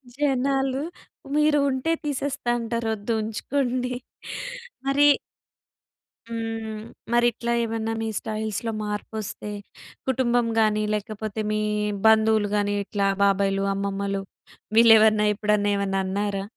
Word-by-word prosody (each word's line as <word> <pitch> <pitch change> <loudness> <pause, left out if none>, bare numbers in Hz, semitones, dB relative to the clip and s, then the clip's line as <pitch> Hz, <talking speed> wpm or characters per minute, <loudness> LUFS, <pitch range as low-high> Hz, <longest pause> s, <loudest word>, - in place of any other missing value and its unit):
జనాలు, 270 -1 +1 0.5
మీరు 300 -1 +4
ఉంటే 260 +4 0
తీసేస్తా 280 -3 -2
అంటారు. 230 0 -2
వద్దు 215 +2 -3
ఉంచుకోండి. 250 +3 -1 0.9
మరి 285 +1 +5 1.2
హ్మ్. 225 -1 -4 0.3
మరి 240 0 +4
ఇట్లా 235 +1 -3
ఏమన్నా 225 0 -2
మీ 225 - -2
స్టైల్స్‌లో 220 +1 -3
మార్పు 210 +1 -4
వస్తే 210 0 -6 0.6
కుటుంబం 245 -2 +2
కానీ, 215 -1 +3
లేకపోతే 215 +1 -3
మీ 215 0 0 0.5
బంధువులు 220 -1 +4
గాని, 205 0 +1
ఇట్లా 200 0 0 0.2
బాబాయిలు, 195 0 +2
అమ్మమ్మలు 200 0 -2 0.6
వీళ్ళు 230 0 +9
ఏమన్నా 215 -1 +4
ఎప్పుడన్నా 210 -1 +1
ఏమన్నా 195 -1 -1
అన్నారా? 200 +1 -1
220 Hz, 110 wpm, -25 LUFS, 205-245 Hz, 1.2 s, వీళ్ళు